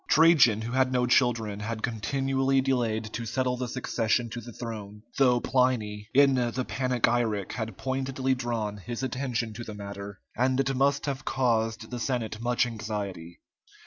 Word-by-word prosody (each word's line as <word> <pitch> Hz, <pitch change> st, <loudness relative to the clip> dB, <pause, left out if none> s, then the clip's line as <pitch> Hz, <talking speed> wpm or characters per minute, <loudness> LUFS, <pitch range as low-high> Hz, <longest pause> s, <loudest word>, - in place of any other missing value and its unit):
Trajan, 145 Hz, -9 st, +5 dB
who 115 Hz, -, -4 dB
had 130 Hz, 0 st, +2 dB
no 125 Hz, -1 st, +2 dB
children, 120 Hz, -5 st, +2 dB
had 110 Hz, +1 st, -4 dB
continually 135 Hz, +3 st, +1 dB
delayed 115 Hz, -5 st, 0 dB
to 115 Hz, -, -3 dB
settle 125 Hz, +2 st, 0 dB
the 125 Hz, 0 st, -3 dB
succession 120 Hz, -1 st, 0 dB
to 120 Hz, -, -5 dB
the 120 Hz, +1 st, -9 dB
throne, 105 Hz, -3 st, -7 dB, 0.2 s
though 125 Hz, -3 st, +5 dB
Pliny, 110 Hz, -5 st, 0 dB
in 140 Hz, 0 st, +6 dB
the 125 Hz, 0 st, 0 dB
"Panegyric" 120 Hz, -5 st, 0 dB
had 110 Hz, -4 st, -4 dB
pointedly 130 Hz, 0 st, -1 dB
drawn 115 Hz, -5 st, -2 dB
his 120 Hz, +5 st, -6 dB
attention 125 Hz, -4 st, -2 dB
to 120 Hz, -, -7 dB
the 105 Hz, -2 st, -7 dB
matter, 100 Hz, 0 st, -7 dB, 0.2 s
and 130 Hz, +1 st, +2 dB
it 135 Hz, 0 st, +1 dB
must 140 Hz, +2 st, +2 dB
have 135 Hz, -2 st, -3 dB
caused 115 Hz, -3 st, 0 dB
the 125 Hz, -, -4 dB
Senate 115 Hz, -3 st, -2 dB
much 120 Hz, 0 st, +2 dB
anxiety. 105 Hz, -7 st, -5 dB
120 Hz, 160 wpm, -28 LUFS, 110-130 Hz, 0.2 s, in